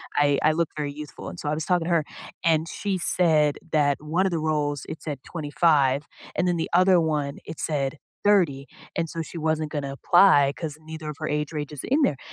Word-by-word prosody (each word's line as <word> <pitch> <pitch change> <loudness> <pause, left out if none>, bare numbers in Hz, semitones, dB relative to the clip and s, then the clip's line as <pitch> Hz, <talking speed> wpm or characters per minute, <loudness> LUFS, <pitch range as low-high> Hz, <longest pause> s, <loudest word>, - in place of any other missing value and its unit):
I 145 -1 +3
I 155 - +5
look 165 -1 +1
very 145 -1 -2
youthful, 150 0 -8
and 175 - -9
so 150 - -3
I - - 0
was 155 - -3
talking 175 -3 +1
to - - -3
her, 165 -3 +3 0.4
and 165 -1 +2
she 200 -2 -2
said 155 -5 +3 0.2
that 145 -2 +3
one 165 +5 0
of 190 - +1
the 165 - 0
roles 150 -3 -1
it 160 - -7
said 145 -4 -4
25 145 -3 +2 0.3
and 180 - +1
then 175 -1 +1
the 160 - -2
other 185 0 +5
one 150 -3 -1
it 160 - -8
said 140 -2 -1 0.3
30 165 -10 +3 0.3
and 165 -1 -1
so 165 - -4
she 165 - -8
wasn't 155 -1 -1
gonna 140 -3 -3
apply 175 -6 +5
'cause 155 -3 -5
neither 160 0 -7
of 150 - -5
her 155 - -3
age 150 0 -1
ranges 150 -2 -4
are - - -9
in 285 +4 +3
there, 145 - +2
155 Hz, 225 wpm, -25 LUFS, 145-170 Hz, 0.4 s, I